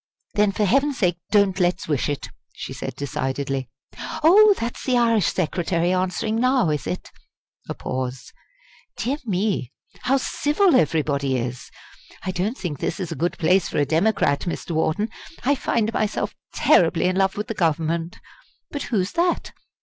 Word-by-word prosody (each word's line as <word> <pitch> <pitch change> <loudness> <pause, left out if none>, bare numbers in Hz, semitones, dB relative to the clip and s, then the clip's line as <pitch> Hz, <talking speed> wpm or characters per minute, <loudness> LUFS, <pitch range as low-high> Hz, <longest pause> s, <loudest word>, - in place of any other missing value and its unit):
"Then 210 -1 +3
for 210 +1 0
heaven's 275 +6 +2
sake 175 -5 +1
don't 200 -2 +3
let's 180 0 +1
wish 145 -2 0
it!" 145 - -4 0.2
she - - -7
said - - -6
decidedly. 135 -1 -3 0.5
"Oh, 405 +5 +7
that's 235 +1 -4
the 255 -2 +2
Irish 230 -4 +3
Secretary 175 0 0
answering 185 +4 -1
now, 255 -7 +3
is 150 -9 -2
it?" 90 - -5 0.6
a - - -3
pause 130 0 -5 0.6
"Dear 270 +5 -1
me, 190 - 0 0.3
how 270 +2 +2
civil 295 +6 +2
everybody 140 - +1
is. 125 +1 -4 0.5
I 185 - -2
don't 195 +8 -2
think 155 -7 -4
this - - -2
is 180 -4 -4
a - - -3
good 175 +2 -1
place 180 +2 +2
for - - -4
a 145 - +3
Democrat, 160 -3 +2
Mr. 170 - -4
Wharton 160 +7 0 0.4
I 280 - +4
find 230 -4 0
myself 215 -1 -1 0.2
terribly 170 -1 +3
in 185 0 +2
love 195 0 +1
with 210 - -2
the - - -4
Government. 165 -1 -1 0.5
But 285 - -4
who's 200 -5 0
that?" 345 +1 0
185 Hz, 160 wpm, -23 LUFS, 155-225 Hz, 0.6 s, Oh